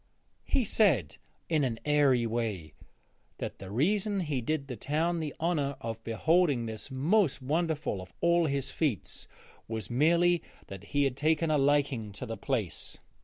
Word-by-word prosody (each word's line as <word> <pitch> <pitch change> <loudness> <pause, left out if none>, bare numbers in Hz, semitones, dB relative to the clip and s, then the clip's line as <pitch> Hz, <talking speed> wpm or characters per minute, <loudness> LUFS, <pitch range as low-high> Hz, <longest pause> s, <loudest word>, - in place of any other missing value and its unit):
He 260 - +2
said, 195 - +2 0.3
in 155 -3 +2
an 115 -4 -1
airy 140 -5 +4
way, 110 -9 -3 0.6
that - - -5
the 95 - -8
reason 195 - +1
he 150 -6 -2
did 145 +3 -1
the 125 - -5
town 160 +9 0
the 155 -3 -4
honour 150 -4 0
of 115 0 -5
beholding 145 - +2
this 110 +3 -5
most 150 +6 +2
wonderful 155 - -1
of 90 -1 -11
all 170 -1 +3
his 140 -1 -2
feats 135 - -2 0.4
was 110 +1 -4
merely 170 +6 +3 0.2
that 95 0 -9
he 145 +6 +1
had 135 -2 0
taken 155 +3 +1
a 150 - +3
liking 135 -6 +1
to 115 - -7
the 115 -2 -4
place. 110 - -3
140 Hz, 160 wpm, -30 LUFS, 115-160 Hz, 0.6 s, airy